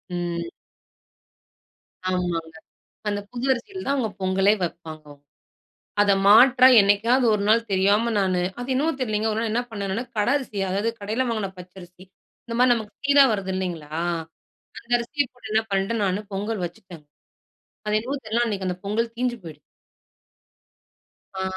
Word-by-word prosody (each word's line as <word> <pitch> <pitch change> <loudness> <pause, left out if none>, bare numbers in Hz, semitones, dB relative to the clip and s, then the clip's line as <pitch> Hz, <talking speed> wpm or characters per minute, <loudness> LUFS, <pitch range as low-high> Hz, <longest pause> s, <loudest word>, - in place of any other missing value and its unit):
ம். 170 -1 -3 1.6
ஆமாங்க. 170 -3 -2 0.5
அந்த 205 0 -1
புது 250 +1 -4
அரிசில 375 +10 -5
தான் 280 - +1
அவுங்க 235 -5 0
பொங்கலே 190 +2 +3
வைப்பாங்க 160 -2 -5
அவுங் 145 0 -16 0.8
அத 205 -1 +4
மாற்றா, 250 +5 +7
என்னைக்காவது 225 +6 +3
1 200 - -2
நாள் 230 +1 +3
தெரியாம 205 +5 +2
நானு 185 -2 +1 0.2
அது 245 +2 -6
என்னமோ 300 +5 +1
தெரியலைங்க. 215 -3 -1
1 215 - -1
நாள் 225 -1 -1
என்ன 240 - +1
பண்ணேன் 200 -3 -4
நானு! 235 +4 -2
கடை 210 +5 +2
அரிசி, 250 -7 -8
அதாவது 200 +4 0
கடையில 220 +6 -1
வாங்கின 215 -4 -2
பச்சரிசி 180 0 -13 0.4
இந்த 230 - -6
மாரி 250 0 +5
நமக்கு 220 -3 -5
சீரா 285 0 +6
வருது 195 -2 -2
இல்லைங்களா. 175 -5 -4 0.9
அந்த 235 - -18
அரிசிய 280 +5 -1
போட்டு 225 -3 -11
என்னா 220 0 +2
பண்ணிட்டேன் 195 +3 0
நானு 190 +2 -1
பொங்கல் 205 -1 -3
வச்சுட்டேன்ங்க. 170 -3 -12 0.8
அது 210 0 +1
என்னமோ 265 +5 -4
தெரியல. 230 +2 0
அன்னைக்கு 195 -4 -3
அந்த 180 - -2
பொங்கல் 230 +3 -1
தீஞ்ஞு 245 0 -1
போய்டு 155 -3 -10 1.8
ஆ, 190 - -2
210 Hz, 150 wpm, -24 LUFS, 185-235 Hz, 1.8 s, மாற்றா